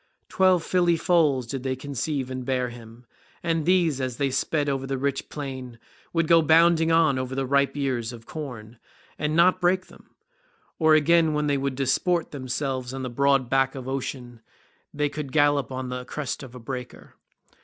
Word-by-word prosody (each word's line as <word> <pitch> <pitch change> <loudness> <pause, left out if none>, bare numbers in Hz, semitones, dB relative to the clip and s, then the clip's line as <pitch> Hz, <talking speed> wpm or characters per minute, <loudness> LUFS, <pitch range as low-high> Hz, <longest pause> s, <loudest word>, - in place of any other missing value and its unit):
Twelve 185 -3 +3
filly 175 -2 +2
foals 155 -7 +2
did 130 +2 -5
they 130 0 -2
conceive 135 0 -3
and 130 0 -4
bear 125 -1 -1
him, 120 0 -13 0.4
and 165 -2 -1
these, 170 -7 +2
as 130 -2 -3
they 140 -2 0
sped 145 +2 0
over 135 -1 -2
the 135 0 -2
rich 135 0 -2
plain, 130 -4 -7 0.3
would 165 -1 0
go 165 0 +6
bounding 165 +1 +4
on 160 -5 +3
over 130 0 -4
the 135 0 -1
ripe 140 +2 +1
ears 125 -5 -1
of 115 -2 -11
corn 120 -7 -8 0.4
and 150 +1 -1
not 180 +2 +4
break 185 +1 +1
them; - - -18 0.7
or 160 -1 +5
again 160 +1 +4
when 150 0 0
they 145 -1 +1
would 135 -1 -2
disport 155 +6 0
themselves 130 -1 -3
on 135 - -5
the 130 - -4
broad 140 0 +2
back 135 +1 +1
of 130 -1 -7
Ocean 125 -3 -5 0.5
they 150 0 0
could 145 -2 -6
gallop 145 -3 +2
on 130 0 -4
the 125 0 -4
crest 140 +2 -5
of 130 -3 -11
a - - -8
breaker. 125 +1 -8
135 Hz, 185 wpm, -25 LUFS, 130-155 Hz, 0.7 s, go